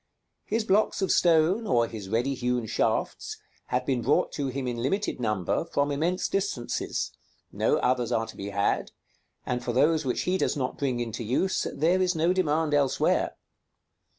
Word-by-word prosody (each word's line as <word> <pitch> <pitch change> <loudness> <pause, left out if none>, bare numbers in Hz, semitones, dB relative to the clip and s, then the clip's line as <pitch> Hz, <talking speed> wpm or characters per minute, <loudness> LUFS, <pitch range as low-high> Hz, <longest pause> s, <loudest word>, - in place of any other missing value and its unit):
His 225 +2 0
blocks 205 0 +2
of 190 - +1
stone, 175 +6 +3
or 120 -7 +3
his 105 -4 -8
ready 120 +6 +1
hewn 125 -2 -1
shafts, - - -1 0.3
have 125 0 -1
been 130 -3 0
brought 135 +6 +2
to 140 -2 -2
him 130 0 -3
in 120 -1 -2
limited 170 - -1
number, 105 - 0
from 145 -3 0
immense 165 +6 0
distances; 195 -12 -2 0.4
no - - +1
others 125 -2 +1
are 115 - +1
to 110 - -11
be 100 +1 -5
had; 100 0 0 0.6
and 125 0 -2
for - - -2
those 155 +4 +3
which 130 -3 -1
he 185 +1 0
does - - 0
not 130 -2 -3
bring 130 -4 0
into 115 -1 -3
use, 135 - 0
there 170 +6 +2
is 180 -1 +2
no 165 +3 +2
demand 160 -4 +1
elsewhere. 140 -2 +2
140 Hz, 175 wpm, -27 LUFS, 120-170 Hz, 0.6 s, stone